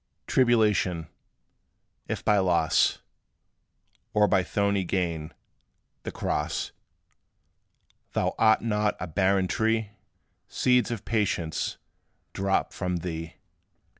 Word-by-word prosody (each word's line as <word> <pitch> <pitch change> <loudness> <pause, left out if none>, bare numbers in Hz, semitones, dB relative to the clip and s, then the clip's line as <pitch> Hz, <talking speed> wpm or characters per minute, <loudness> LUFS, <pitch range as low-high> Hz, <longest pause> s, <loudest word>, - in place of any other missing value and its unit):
Tribulation, 105 - +2 1.0
if - - -4
by 105 -1 +4
loss, 85 -4 +2 1.1
Or 105 0 +5
by 95 - +3
thorny 100 +1 0
gain, 85 -3 -2 0.7
the - - -5
cross, - - -2 1.4
Thou - - 0
art 110 0 +4
not 105 -2 0
a - - -3
barren 95 +2 +1
tree; 110 +1 0 0.6
Seeds 125 -1 +2
of 115 -5 -5
Patience 100 -7 -1 0.6
drop 95 0 0
from 90 -1 -2
thee. 80 -1 -5
100 Hz, 95 wpm, -27 LUFS, 90-110 Hz, 1.4 s, Or